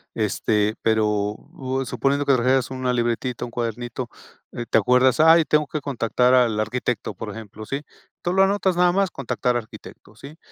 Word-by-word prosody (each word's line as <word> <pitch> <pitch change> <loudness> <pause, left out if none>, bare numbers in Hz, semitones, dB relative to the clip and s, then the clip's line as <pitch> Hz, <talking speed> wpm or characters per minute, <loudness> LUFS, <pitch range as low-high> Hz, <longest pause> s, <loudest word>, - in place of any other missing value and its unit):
este, 105 0 0
pero 110 -1 +2
o 130 - -3
suponiendo 135 +4 0
que 140 - +4
trajeras 130 0 +2
una 130 -1 -1
libretita, 120 +1 -1
un 120 - -6
cuadernito, 120 +1 -4 0.4
eh, 120 - -5
te - - +4
acuerdas: 125 +4 +3
"Ay, 160 +1 +7
tengo 150 0 +1
que 155 0 -4
contactar 125 -1 +1
al 120 -4 +3
arquitecto", 120 0 -2
por 105 +3 -7
ejemplo, 110 0 -9
¿sí? 140 +5 -4 0.4
Tú 175 - -1
lo 190 +1 +4
anotas 195 -2 +1
nada 180 0 +4
más: 195 -1 +1
"Contactar 125 -2 -1
arquitecto", 110 -2 -11
¿sí? 140 +7 -12
125 Hz, 170 wpm, -23 LUFS, 115-140 Hz, 0.4 s, Ay